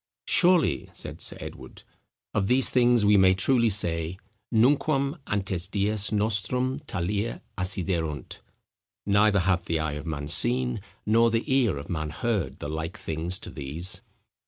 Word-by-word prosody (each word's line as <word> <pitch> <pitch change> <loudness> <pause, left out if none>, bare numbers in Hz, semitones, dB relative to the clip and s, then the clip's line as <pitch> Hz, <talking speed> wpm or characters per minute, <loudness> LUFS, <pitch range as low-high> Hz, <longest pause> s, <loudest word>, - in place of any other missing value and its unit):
"Surely," 180 -3 +3
said - - -7
Sir - - -2
Edward, - - -10 0.5
"of 100 -2 0
these 130 +3 +4
things 120 -3 +4
we 105 0 +5
may 95 -1 +5
truly 115 +4 +3
say, 85 -3 0 0.3
Nunquam 140 +5 +2
ante 100 -2 -2
dies 100 +3 0
nostros 110 +6 +1
talia 100 +3 -3
acciderunt, 85 -6 -2 0.7
neither 100 0 +3
hath 90 -1 +1
the 85 - 0
eye 80 -1 -2
of 75 +2 -6
man 70 -2 -4
seen, 65 -3 +1 0.2
nor 115 +2 +4
the 115 0 0
ear 125 - +2
of 70 - -8
man 80 -2 -3
heard, 110 +1 -2
the - - -6
like 80 +3 -4
things 80 +4 -3
to - - -9
these." 75 +6 -6
100 Hz, 145 wpm, -26 LUFS, 80-115 Hz, 0.7 s, we